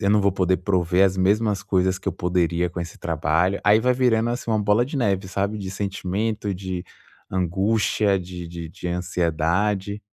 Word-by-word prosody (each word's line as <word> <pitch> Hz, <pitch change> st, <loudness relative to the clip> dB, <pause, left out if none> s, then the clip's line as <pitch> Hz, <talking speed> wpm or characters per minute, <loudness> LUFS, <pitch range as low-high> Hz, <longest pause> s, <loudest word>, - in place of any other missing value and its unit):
eu 100 Hz, -, +1 dB
não 105 Hz, 0 st, +4 dB
vou 100 Hz, 0 st, +3 dB
poder 95 Hz, -1 st, +1 dB
prover 90 Hz, 0 st, +2 dB
as 95 Hz, -1 st, +1 dB
mesmas 100 Hz, +2 st, +2 dB
coisas 95 Hz, 0 st, +1 dB
que -, -, -21 dB
eu -, -, -1 dB
poderia 90 Hz, -1 st, 0 dB
com 90 Hz, -, -7 dB
esse 85 Hz, -, -6 dB
trabalho". 85 Hz, +4 st, 0 dB
Aí 105 Hz, +1 st, +5 dB
vai 125 Hz, +2 st, +3 dB
virando, 120 Hz, -2 st, +2 dB
assim, 120 Hz, 0 st, -4 dB
uma 110 Hz, -1 st, +1 dB
bola 105 Hz, +3 st, +3 dB
de 140 Hz, -, -5 dB
neve, 100 Hz, -6 st, 0 dB
sabe, 100 Hz, +2 st, -2 dB
de 95 Hz, -2 st, -5 dB
sentimento, 100 Hz, +2 st, -2 dB
de 95 Hz, -1 st, -5 dB, 0.5 s
angústia, 100 Hz, +2 st, +1 dB
de 90 Hz, -1 st, -7 dB
de 85 Hz, -1 st, -7 dB
de 85 Hz, -, -8 dB
ansiedade. 90 Hz, +4 st, -1 dB
95 Hz, 185 wpm, -23 LUFS, 90-105 Hz, 0.5 s, Aí